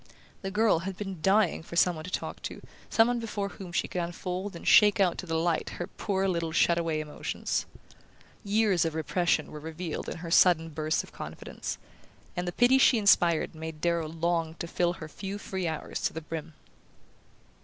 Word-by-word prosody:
The 195 Hz, -, -3 dB
girl 210 Hz, -3 st, +3 dB
had 190 Hz, +2 st, -5 dB
been 195 Hz, -5 st, -6 dB
dying 195 Hz, 0 st, +3 dB
for 170 Hz, -, -9 dB
some 180 Hz, +1 st, +4 dB
one 155 Hz, -, -7 dB
to -, -, -6 dB
talk -, -, -4 dB
to, -, -, -7 dB, 0.3 s
some 225 Hz, 0 st, +5 dB
one 245 Hz, 0 st, 0 dB
before 210 Hz, -3 st, -3 dB
whom 190 Hz, -3 st, -9 dB
she 175 Hz, -, 0 dB
could 180 Hz, -, -2 dB
unfold 180 Hz, +3 st, -4 dB
and 170 Hz, -, -8 dB
shake 210 Hz, -1 st, +7 dB
out 185 Hz, -3 st, +3 dB
to 185 Hz, -, -6 dB
the 165 Hz, 0 st, 0 dB
light 165 Hz, 0 st, 0 dB
her 175 Hz, -, -3 dB
poor 195 Hz, 0 st, -1 dB
little 170 Hz, -3 st, -1 dB
shut 170 Hz, +1 st, +3 dB
away 165 Hz, -2 st, -1 dB
emotions. 150 Hz, -1 st, -3 dB, 0.8 s
Years 205 Hz, -3 st, +2 dB
of 160 Hz, -1 st, -2 dB
repression 160 Hz, 0 st, 0 dB
were 150 Hz, -, -7 dB
revealed 160 Hz, +1 st, -5 dB
in -, -, -5 dB
her 165 Hz, 0 st, -7 dB
sudden 165 Hz, -2 st, +5 dB
burst 155 Hz, 0 st, -1 dB
of -, -, -14 dB
confidence; -, -, -6 dB, 0.6 s
and 180 Hz, 0 st, -2 dB
the -, -, 0 dB
pity 245 Hz, +6 st, +4 dB
she 260 Hz, -, +6 dB
inspired 175 Hz, -7 st, +4 dB
made 160 Hz, -1 st, -7 dB
Darrow 170 Hz, -1 st, 0 dB
long 165 Hz, 0 st, -1 dB
to 170 Hz, -, -5 dB
fill 175 Hz, +1 st, 0 dB
her 155 Hz, -, -8 dB
few 195 Hz, +5 st, -6 dB
free 190 Hz, -3 st, -3 dB
hours 160 Hz, -1 st, -4 dB
to -, -, 0 dB
the 160 Hz, -, -5 dB
brim. 160 Hz, 0 st, -6 dB
175 Hz, 195 wpm, -29 LUFS, 160-195 Hz, 0.8 s, shake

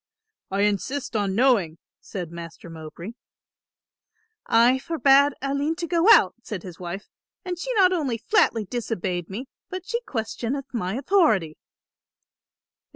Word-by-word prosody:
"I 195 Hz, +1 st, -1 dB
insist 210 Hz, +6 st, -1 dB
on 200 Hz, -3 st, 0 dB
knowing," 215 Hz, -10 st, +3 dB, 0.2 s
said 180 Hz, -5 st, -7 dB
Master 170 Hz, 0 st, -9 dB
Mowbray. 165 Hz, +4 st, -8 dB, 1.4 s
"I 240 Hz, +3 st, +4 dB
forbade 280 Hz, -1 st, +4 dB
Aline 280 Hz, +3 st, 0 dB
to 345 Hz, 0 st, -4 dB
go 340 Hz, +4 st, +2 dB
out," 185 Hz, -, +7 dB
said 205 Hz, -6 st, -6 dB
his 180 Hz, -3 st, -10 dB
wife, 180 Hz, +3 st, -6 dB, 0.4 s
"and 360 Hz, -1 st, -4 dB
she -, -, -3 dB
not 370 Hz, -3 st, +5 dB
only 280 Hz, -9 st, -1 dB
flatly 230 Hz, -, +2 dB
disobeyed 185 Hz, -7 st, -3 dB
me, 220 Hz, +8 st, -5 dB, 0.2 s
but 370 Hz, -1 st, -6 dB
she 470 Hz, +1 st, -2 dB
questioneth 255 Hz, -, -4 dB
my 195 Hz, -4 st, -2 dB
authority." 260 Hz, -, +2 dB
235 Hz, 130 wpm, -24 LUFS, 185-285 Hz, 1.4 s, out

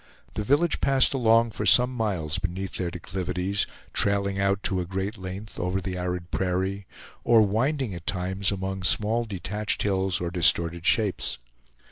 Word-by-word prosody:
The 105 Hz, -, -3 dB
village 145 Hz, +9 st, +2 dB
passed 135 Hz, -1 st, +3 dB
along 115 Hz, -3 st, +3 dB
for 105 Hz, -, -5 dB
some 125 Hz, +4 st, +6 dB
miles 90 Hz, -9 st, -1 dB
beneath 95 Hz, +1 st, -4 dB
their 90 Hz, -2 st, -2 dB
declivities, 90 Hz, +2 st, -3 dB, 0.3 s
trailing 100 Hz, -1 st, +1 dB
out 100 Hz, 0 st, +1 dB
to 95 Hz, -3 st, 0 dB
a -, -, -4 dB
great 95 Hz, +4 st, -3 dB
length 95 Hz, +2 st, -8 dB
over 90 Hz, +2 st, -1 dB
the 95 Hz, 0 st, -4 dB
arid 90 Hz, -1 st, -4 dB
prairie, 95 Hz, +1 st, -2 dB, 0.4 s
or 115 Hz, -2 st, +5 dB
winding 120 Hz, +3 st, 0 dB
at 85 Hz, -1 st, -9 dB
times 95 Hz, +1 st, 0 dB
among 95 Hz, -1 st, -4 dB
small 110 Hz, +5 st, +2 dB
detached 105 Hz, +1 st, -3 dB
hills 95 Hz, -2 st, 0 dB
or 85 Hz, -1 st, -3 dB
distorted 85 Hz, -1 st, +2 dB
shapes. 105 Hz, -5 st, +1 dB
95 Hz, 155 wpm, -26 LUFS, 90-105 Hz, 0.4 s, some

